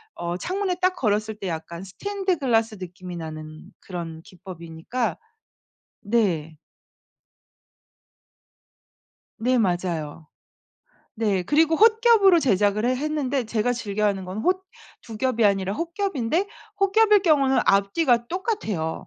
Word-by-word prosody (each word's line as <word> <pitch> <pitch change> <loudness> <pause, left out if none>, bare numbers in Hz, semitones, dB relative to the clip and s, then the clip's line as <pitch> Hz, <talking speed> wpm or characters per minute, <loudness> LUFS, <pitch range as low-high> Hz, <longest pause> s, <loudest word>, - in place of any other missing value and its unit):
어 175 +1 -4
창문에 370 - -2
딱 370 0 +2
걸었을 215 -4 0
때 205 -2 -6
약간 170 +1 -6
스테인드 385 - -3
글라스 225 -5 +1
느낌이 180 0 -8
나는 155 -1 -8
그런 170 -3 -7
기법이니까 180 +5 -5 0.8
네. 180 -8 0 2.8
네 250 +3 +2
맞아요. 175 -6 -2 0.9
네. 205 -4 0
그리고 320 - +3
홑겹으로 440 -4 +5
제작을 205 -3 +2
해 255 +1 +1
했는데 280 -2 -1
제가 225 +2 0
즐겨하는 205 -4 -1
건 185 +3 -6
홑 370 +10 0 0.4
2 225 -2 -9
겹이 235 -1 +1
아니라 195 -1 +2
홑겹인데 335 - -1 0.3
홑겹일 415 +1 +4
경우는 280 -6 +3
앞뒤가 235 +5 +2
똑같아요. 330 - -2
225 Hz, 250 characters per minute, -24 LUFS, -, 2.8 s, 홑겹으로